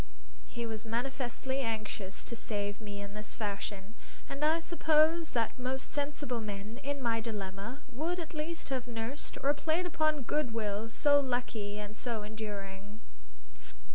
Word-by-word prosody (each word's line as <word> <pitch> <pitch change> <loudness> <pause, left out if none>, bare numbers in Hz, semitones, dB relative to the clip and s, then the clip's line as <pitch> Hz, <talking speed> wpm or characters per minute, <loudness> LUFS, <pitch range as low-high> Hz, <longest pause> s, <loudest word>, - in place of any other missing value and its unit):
He 235 -1 -3
was 220 -1 -3
manifestly 255 +3 0
anxious 215 -5 -1
to 235 - -2
save 205 -2 -2
me 205 -1 -4
in 200 0 -7
this 210 0 -5
fashion. 205 -1 -3 0.3
And 275 +2 -3
I 315 +2 +5
suppose 325 -1 +4
that 230 0 +1
most 260 +1 -1
sensible 285 -4 0
men, 210 +2 -4
in 280 0 -1
my 230 -1 +3
dilemma, 210 +3 -3
would 325 +8 0
at 325 -2 -4
least 320 +1 -2
have 255 -2 0
nursed 235 +4 -3
or 280 +1 +6
played 320 +4 +2
upon 310 -4 +2
good 250 -3 +1
will 215 0 0
so 285 +5 +6
lucky 245 -6 0
and 210 0 -5
so 230 -2 -1
enduring. 205 -1 -5
235 Hz, 150 wpm, -34 LUFS, 210-285 Hz, 0.3 s, or